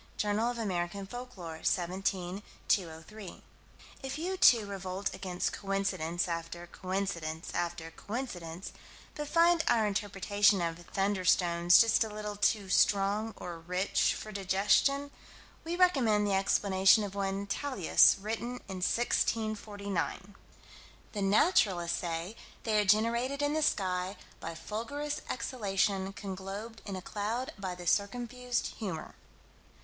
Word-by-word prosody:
(Jour. 215 Hz, +4 st, 0 dB
Amer. 180 Hz, -6 st, -1 dB, 0.2 s
Folk 245 Hz, +2 st, -8 dB
Lore, 165 Hz, -3 st, -7 dB
17 185 Hz, +1 st, -1 dB, 0.3 s
203.) 180 Hz, +2 st, -2 dB, 0.6 s
If 270 Hz, +1 st, -4 dB
you, 360 Hz, +4 st, -2 dB
too, 235 Hz, -, +6 dB
revolt 195 Hz, 0 st, -4 dB
against 180 Hz, -2 st, -3 dB
coincidence 195 Hz, -4 st, -1 dB
after 170 Hz, 0 st, -4 dB
coincidence 175 Hz, -3 st, -4 dB
after 170 Hz, -1 st, -3 dB
coincidence, 180 Hz, -5 st, -6 dB, 0.4 s
but 295 Hz, 0 st, -5 dB
find 335 Hz, +1 st, +4 dB
our 225 Hz, -2 st, +4 dB
interpretation 205 Hz, 0 st, +2 dB
of 165 Hz, -1 st, -2 dB
"thunderstones" 180 Hz, -3 st, +4 dB
just 230 Hz, 0 st, +5 dB
a 220 Hz, -, -5 dB
little 210 Hz, 0 st, -5 dB
too 205 Hz, 0 st, +1 dB
strong 205 Hz, +3 st, +2 dB
or 170 Hz, -2 st, -7 dB
rich 180 Hz, +4 st, +1 dB
for 215 Hz, -, -7 dB
digestion, 205 Hz, +9 st, +2 dB, 0.5 s
we 335 Hz, +1 st, -3 dB
recommend 260 Hz, -, +3 dB
the 200 Hz, -, +1 dB
explanation 195 Hz, +1 st, +4 dB
of 200 Hz, -2 st, -5 dB
one, 195 Hz, 0 st, -2 dB
Tallius, 200 Hz, -, +4 dB
written 225 Hz, +4 st, -3 dB
in 190 Hz, -2 st, -5 dB
1649: 205 Hz, -3 st, -1 dB, 0.8 s
"The 205 Hz, -, -4 dB
naturalists 195 Hz, -, +3 dB
say 170 Hz, +3 st, -4 dB, 0.3 s
they 215 Hz, -2 st, +2 dB
are -, -, -1 dB
generated 235 Hz, +7 st, +2 dB
in 290 Hz, 0 st, +1 dB
the 315 Hz, -, 0 dB
sky 185 Hz, -7 st, 0 dB, 0.2 s
by 165 Hz, -, -6 dB
fulgurous 285 Hz, -, -4 dB
exhalation 200 Hz, -5 st, -1 dB
conglobed 195 Hz, +4 st, -7 dB
in 195 Hz, -, -4 dB
a 185 Hz, -, -6 dB
cloud 225 Hz, +6 st, -3 dB
by 185 Hz, -2 st, -4 dB
the 180 Hz, -, -9 dB
circumfused 245 Hz, +6 st, 0 dB
humor." 185 Hz, -8 st, -5 dB
200 Hz, 125 wpm, -31 LUFS, 185-225 Hz, 0.8 s, too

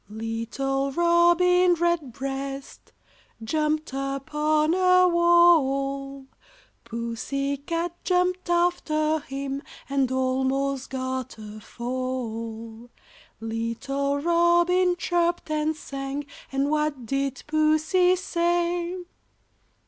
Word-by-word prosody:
Little 230 Hz, +5 st, -2 dB
Robin 345 Hz, +2 st, +4 dB
Redbreast 275 Hz, -4 st, -3 dB, 0.5 s
jumped 305 Hz, +4 st, -1 dB
upon 300 Hz, +3 st, 0 dB
a 365 Hz, 0 st, +5 dB
wall, 275 Hz, -6 st, +3 dB, 0.6 s
Pussy 235 Hz, +4 st, -3 dB
cat 335 Hz, +4 st, -3 dB
jumped 360 Hz, 0 st, 0 dB
after 315 Hz, -3 st, +1 dB
him 275 Hz, -1 st, -5 dB, 0.3 s
and 275 Hz, -2 st, 0 dB
almost 265 Hz, +1 st, 0 dB
got 260 Hz, -1 st, -4 dB
a 215 Hz, 0 st, -9 dB
fall; 230 Hz, -2 st, -5 dB, 0.5 s
Little 230 Hz, +5 st, -2 dB
Robin 345 Hz, +3 st, +3 dB
chirped 345 Hz, -2 st, -1 dB
and 305 Hz, +1 st, 0 dB
sang, 275 Hz, -1 st, -5 dB, 0.3 s
and 275 Hz, +2 st, 0 dB
what 300 Hz, -4 st, -1 dB
did 275 Hz, +2 st, -2 dB
Pussy 310 Hz, +4 st, +3 dB
say? 345 Hz, -1 st, 0 dB
280 Hz, 80 wpm, -25 LUFS, 265-345 Hz, 0.6 s, a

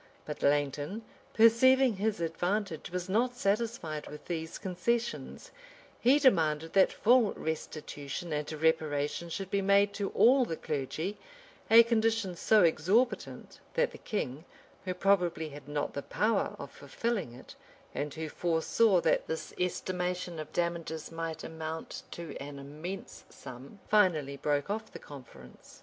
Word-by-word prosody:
But 150 Hz, -, -6 dB
Langton, 145 Hz, +8 st, 0 dB, 0.3 s
perceiving 235 Hz, +1 st, +5 dB
his 210 Hz, -1 st, 0 dB
advantage, 175 Hz, +2 st, -2 dB
was 180 Hz, 0 st, -4 dB
not 240 Hz, +6 st, +1 dB
satisfied 200 Hz, -8 st, -1 dB
with 150 Hz, -, -10 dB
these 160 Hz, -2 st, -4 dB
concessions: 225 Hz, +6 st, -3 dB, 0.5 s
he 260 Hz, +4 st, +5 dB
demanded 165 Hz, -, +2 dB
that 195 Hz, -1 st, +5 dB
full 235 Hz, -2 st, +4 dB
restitution 155 Hz, 0 st, -5 dB
and 150 Hz, +1 st, -2 dB
reparation 155 Hz, 0 st, 0 dB
should 190 Hz, +3 st, -5 dB
be 200 Hz, -, +1 dB
made 200 Hz, +1 st, +4 dB
to 200 Hz, -1 st, -2 dB
all 255 Hz, +3 st, +6 dB
the 165 Hz, -9 st, -3 dB
clergy; 155 Hz, +7 st, -3 dB, 0.5 s
a 230 Hz, +1 st, +9 dB
condition 225 Hz, -4 st, +1 dB
so 215 Hz, +3 st, +4 dB
exorbitant, 185 Hz, +10 st, +1 dB, 0.2 s
that -, -, +2 dB
the -, -, -12 dB
king, 150 Hz, -, -3 dB, 0.4 s
who 185 Hz, -1 st, -2 dB
probably 175 Hz, -5 st, +1 dB
had 145 Hz, -1 st, -11 dB
not 145 Hz, 0 st, -2 dB
the 140 Hz, -, -3 dB
power 215 Hz, +9 st, 0 dB
of -, -, -8 dB
fulfilling 215 Hz, -, -3 dB
it, 125 Hz, -, -12 dB, 0.4 s
and 145 Hz, 0 st, -3 dB
who 160 Hz, 0 st, -4 dB
foresaw 175 Hz, +5 st, +2 dB
that -, -, +1 dB
this 160 Hz, -, -4 dB
estimation 180 Hz, -1 st, -2 dB
of 155 Hz, -, -7 dB
damages 170 Hz, -2 st, -3 dB
might 165 Hz, -1 st, -5 dB
amount 160 Hz, 0 st, -6 dB
to 170 Hz, -2 st, -7 dB
an 140 Hz, 0 st, -8 dB
immense 155 Hz, +7 st, -7 dB
sum, 130 Hz, +6 st, -11 dB
finally 165 Hz, -10 st, +3 dB
broke 145 Hz, 0 st, 0 dB
off 220 Hz, +1 st, -4 dB
the -, -, -8 dB
conference. 115 Hz, -, -13 dB
170 Hz, 140 wpm, -30 LUFS, 150-210 Hz, 0.5 s, a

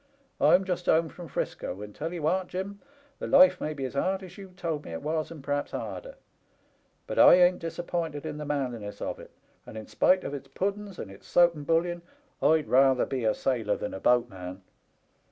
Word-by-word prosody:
I'm 190 Hz, -, +5 dB
just 180 Hz, -1 st, -3 dB
home 160 Hz, 0 st, +3 dB
from 175 Hz, +1 st, -10 dB
'Frisco, 100 Hz, -, -4 dB
and 105 Hz, 0 st, -9 dB
tell 160 Hz, +8 st, -4 dB
*ee 175 Hz, -, -5 dB
what, 180 Hz, +4 st, 0 dB
Jim, 200 Hz, +2 st, -5 dB, 0.4 s
the -, -, -4 dB
life 275 Hz, 0 st, +6 dB
may 155 Hz, 0 st, -3 dB
be 135 Hz, -2 st, -3 dB
as 130 Hz, -, -5 dB
hard 190 Hz, +7 st, 0 dB
as 180 Hz, -1 st, -11 dB
you 195 Hz, -1 st, -10 dB
told 160 Hz, -5 st, -3 dB
me 85 Hz, -, -8 dB
it 80 Hz, -, -6 dB
was, 155 Hz, 0 st, -1 dB
and 155 Hz, -4 st, -10 dB
p'r'aps 145 Hz, 0 st, -1 dB
harder; -, -, -6 dB, 0.9 s
but -, -, -3 dB
I -, -, +9 dB
ain't 180 Hz, 0 st, +4 dB
disappointed 165 Hz, -2 st, -4 dB
in 150 Hz, -1 st, -5 dB
the -, -, -4 dB
manliness 125 Hz, -8 st, -3 dB
of -, -, -4 dB
it, -, -, -12 dB, 0.3 s
and, 110 Hz, 0 st, -9 dB
spite 185 Hz, 0 st, +3 dB
of 140 Hz, -, -5 dB
its 140 Hz, -1 st, -6 dB
puddens, 200 Hz, +6 st, -3 dB
and 95 Hz, -, -7 dB
its 95 Hz, -, -15 dB
soap 175 Hz, -1 st, +5 dB
and 145 Hz, -3 st, -9 dB
bullion, 175 Hz, +1 st, +1 dB, 0.4 s
I'd 155 Hz, -1 st, +3 dB
rather 130 Hz, 0 st, +4 dB
be 130 Hz, -4 st, -3 dB
a 110 Hz, -, +2 dB
sailor 115 Hz, -6 st, 0 dB
than 105 Hz, -, -5 dB
a 95 Hz, -, -5 dB
boatman. 95 Hz, -7 st, 0 dB
155 Hz, 205 wpm, -28 LUFS, 130-180 Hz, 0.9 s, I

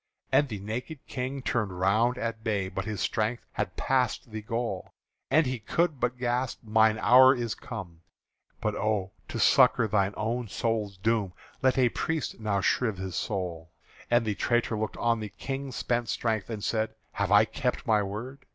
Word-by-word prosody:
And 145 Hz, -2 st, +4 dB
the 105 Hz, -, -4 dB
naked 115 Hz, +10 st, -5 dB
King 130 Hz, +1 st, -4 dB
turned 105 Hz, -9 st, -1 dB
round 110 Hz, +7 st, +3 dB
at 115 Hz, -2 st, -3 dB
bay, 100 Hz, -4 st, 0 dB
But 95 Hz, 0 st, -4 dB
his 105 Hz, -2 st, -3 dB
strength 110 Hz, +2 st, -1 dB
had -, -, -3 dB
passed 125 Hz, -3 st, 0 dB
the 110 Hz, 0 st, -5 dB
goal, 115 Hz, -3 st, -4 dB, 0.3 s
And 155 Hz, +1 st, +4 dB
he 130 Hz, -1 st, -2 dB
could 155 Hz, +6 st, 0 dB
but 125 Hz, +1 st, 0 dB
gasp: 125 Hz, 0 st, -1 dB
"Mine 110 Hz, 0 st, +4 dB
hour 130 Hz, +4 st, +7 dB
is 120 Hz, -3 st, -2 dB
come; 90 Hz, -8 st, -8 dB, 0.6 s
But 105 Hz, -, 0 dB
oh! 105 Hz, -3 st, -1 dB, 0.2 s
to -, -, -5 dB
succour 115 Hz, -, +5 dB
thine 100 Hz, -1 st, +1 dB
own 115 Hz, +2 st, -1 dB
soul's 105 Hz, -1 st, -2 dB
doom, 105 Hz, -2 st, 0 dB, 0.3 s
Let 130 Hz, 0 st, +3 dB
a 125 Hz, -2 st, +4 dB
priest 160 Hz, +2 st, -2 dB
now 105 Hz, -3 st, 0 dB
shrive 110 Hz, 0 st, +1 dB
my 95 Hz, 0 st, -4 dB
soul!" 85 Hz, -3 st, -3 dB, 0.4 s
And 120 Hz, -1 st, +3 dB
the 105 Hz, -, 0 dB
traitor 120 Hz, +2 st, +1 dB
looked 110 Hz, 0 st, -3 dB
on 115 Hz, -1 st, +1 dB
the 105 Hz, -1 st, -5 dB
King's 135 Hz, +5 st, -5 dB
spent 120 Hz, -1 st, -1 dB
strength 110 Hz, -3 st, -1 dB
And 110 Hz, -3 st, -5 dB
said: 110 Hz, -1 st, -1 dB, 0.2 s
"Have -, -, -1 dB
I -, -, +7 dB
kept -, -, -2 dB
my 105 Hz, -2 st, +3 dB
word? 110 Hz, +7 st, -5 dB
110 Hz, 180 wpm, -28 LUFS, 105-125 Hz, 0.6 s, hour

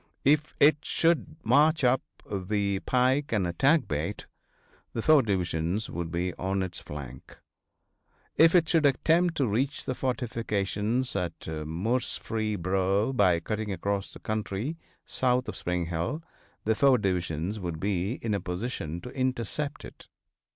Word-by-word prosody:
If 150 Hz, +2 st, +3 dB
it 150 Hz, +2 st, +6 dB
should 165 Hz, -1 st, +1 dB
march 150 Hz, +7 st, +4 dB
up 125 Hz, +1 st, +4 dB, 0.3 s
the 100 Hz, 0 st, -1 dB
pike 130 Hz, +5 st, +1 dB
and 105 Hz, -5 st, +1 dB
attack 135 Hz, -, +3 dB
Bate, 80 Hz, +7 st, -3 dB, 0.7 s
the 115 Hz, -, -2 dB
four 155 Hz, -2 st, +6 dB
divisions 90 Hz, -2 st, -1 dB
would 85 Hz, -1 st, -3 dB
be 90 Hz, +2 st, -2 dB
on 95 Hz, +1 st, 0 dB
its 95 Hz, -, -5 dB
flank. 65 Hz, -3 st, -9 dB, 1.0 s
If 165 Hz, +2 st, +6 dB
it 170 Hz, -3 st, +5 dB
should 160 Hz, -3 st, +4 dB
attempt 165 Hz, +5 st, +2 dB
to 140 Hz, -, +2 dB
reach 130 Hz, +7 st, -1 dB
the 130 Hz, -, -1 dB
fortifications 115 Hz, -2 st, -1 dB
at 90 Hz, -4 st, -3 dB
Murfreesboro 95 Hz, -, -1 dB
by 95 Hz, -8 st, +4 dB
cutting 105 Hz, +3 st, -3 dB
across 100 Hz, +2 st, -2 dB
the -, -, -11 dB
country 110 Hz, +6 st, -3 dB, 0.3 s
south 125 Hz, 0 st, +1 dB
of -, -, -5 dB
Spring 90 Hz, -1 st, -2 dB
Hill 85 Hz, -, -3 dB, 0.4 s
the 110 Hz, -, +2 dB
four 130 Hz, +4 st, +5 dB
divisions 90 Hz, -1 st, -1 dB
would 85 Hz, -4 st, -4 dB
be 95 Hz, +2 st, 0 dB
in 110 Hz, -2 st, 0 dB
a 100 Hz, -, -1 dB
position 90 Hz, -3 st, -4 dB
to 125 Hz, -, -8 dB
intercept 130 Hz, +2 st, -2 dB
it. -, -, -13 dB
105 Hz, 140 wpm, -28 LUFS, 90-130 Hz, 1.0 s, it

